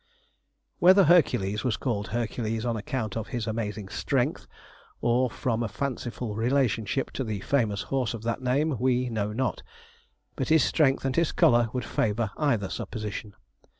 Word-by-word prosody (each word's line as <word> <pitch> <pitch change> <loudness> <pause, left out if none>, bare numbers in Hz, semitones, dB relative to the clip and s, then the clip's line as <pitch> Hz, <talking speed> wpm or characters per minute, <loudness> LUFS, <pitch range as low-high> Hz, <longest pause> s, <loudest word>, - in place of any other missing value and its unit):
Whether 190 +3 +7
Hercules 110 - +3
was 125 -4 0
called 110 -6 -2
Hercules 115 -1 -2
on 120 -1 0
account 110 -1 -3
of 115 -1 -3
his 120 -4 -3
amazing 105 -2 -3
strength, - - -1 0.5
or 125 +2 +2
from 115 -1 -2
a 115 - 0
fanciful 120 -1 -4
relationship 120 0 0
to 135 - -3
the 105 -4 -4
famous 105 -7 0
horse 125 +1 -1
of 110 - -9
that 115 +2 -2
name, 135 +3 +1
we 125 0 +1
know 105 -2 -2
not; 130 +5 -2 0.7
but - - -2
his 160 -1 +5
strength 135 -4 +2
and 135 -1 0
his 170 -1 +2
colour 120 -1 +4
would 125 -2 -3
favour 110 -1 0
either 125 -10 +1
supposition. 105 -1 -5
120 Hz, 155 wpm, -27 LUFS, 110-130 Hz, 0.7 s, Whether